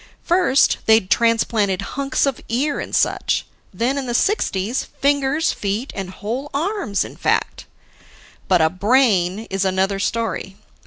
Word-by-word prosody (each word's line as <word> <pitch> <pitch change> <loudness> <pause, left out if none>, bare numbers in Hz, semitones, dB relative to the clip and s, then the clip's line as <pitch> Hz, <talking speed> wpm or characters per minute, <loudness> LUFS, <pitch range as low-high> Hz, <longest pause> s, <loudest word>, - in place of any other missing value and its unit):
First, 345 -6 +3
they'd 220 -4 +4
transplanted 225 -4 +2
hunks 275 0 0
of 275 -3 -2
ear 275 +6 0
and - - -4
such; - - +1 0.3
then, 260 +4 -1
in 265 - -5
the 240 - -2
'60s, 235 - 0
fingers, 285 +3 +2
feet, 210 +6 -3
and 195 -2 -4
whole 230 +9 -5
arms 330 - -1
in - - -10
fact. - - -1 0.8
But 180 -3 +3
a 160 - +3
brain 205 -1 +2
is 195 0 0
another 190 +1 0
story. 225 -3 -2
230 Hz, 140 wpm, -20 LUFS, 195-275 Hz, 0.8 s, they'd